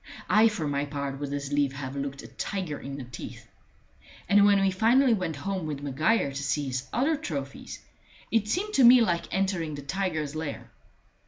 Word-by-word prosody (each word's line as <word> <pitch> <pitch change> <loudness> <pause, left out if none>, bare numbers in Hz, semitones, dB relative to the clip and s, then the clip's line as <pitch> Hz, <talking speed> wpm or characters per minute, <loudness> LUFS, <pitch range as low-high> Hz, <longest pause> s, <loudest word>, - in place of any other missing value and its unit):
I 215 +2 +6
for 195 -9 -2
my 140 0 -1
part 140 -1 -4
would 145 -1 -4
as 140 0 -4
lief 145 -2 +2
have 135 0 -6
looked 140 0 -4
a - - -9
tiger 185 -7 -4
in 140 0 -7
the 135 - -6
teeth. 120 -2 -9 0.8
And 205 0 +6
when 200 -1 +5
we 195 0 +2
finally 235 +6 +4
went 180 -7 -2
home 185 +3 -3
with 145 -2 -5
Maguire 145 - +1
to 140 +1 -5
see 145 +1 0
his 130 -1 -3
other 285 +6 +1
trophies, 140 - -6 0.5
it 225 -2 +2
seemed 400 - -1
to 270 - +4
me 245 +1 +9
like 175 -6 0
entering 185 -5 -1
the 145 - -8
tiger's 155 -3 -2
lair. 155 -2 -5
155 Hz, 190 wpm, -27 LUFS, 140-200 Hz, 0.8 s, me